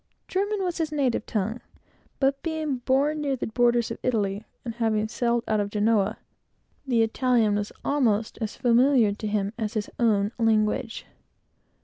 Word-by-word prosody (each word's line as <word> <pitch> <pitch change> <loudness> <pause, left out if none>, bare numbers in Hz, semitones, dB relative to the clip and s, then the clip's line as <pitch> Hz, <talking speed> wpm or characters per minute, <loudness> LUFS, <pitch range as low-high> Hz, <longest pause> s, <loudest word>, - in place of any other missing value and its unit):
German 400 +1 -1
was 355 -2 -2
his 315 -2 -1
native 270 -7 0
tongue, 220 +3 -2 0.6
but 275 0 +1
being 315 -4 -2
born 275 +5 +1
near 280 -2 0
the 255 - -4
borders 240 0 +2
of - - -5
Italy, 205 -4 -1 0.2
and 230 - -4
having 220 -2 0
sailed 235 +1 0
out 215 -1 +1
of 205 0 -1
Genoa, 210 -1 +1 0.7
the 235 -3 +3
Italian 230 -1 +2
was 205 0 -2
almost 230 -7 +1
as 220 -1 -3
familiar 240 -2 +4
to 215 +1 -5
him 205 0 -1
as 220 +1 -3
his 210 -1 -2
own 210 -3 +2
language. 220 0 +1
230 Hz, 155 wpm, -26 LUFS, 215-265 Hz, 0.7 s, familiar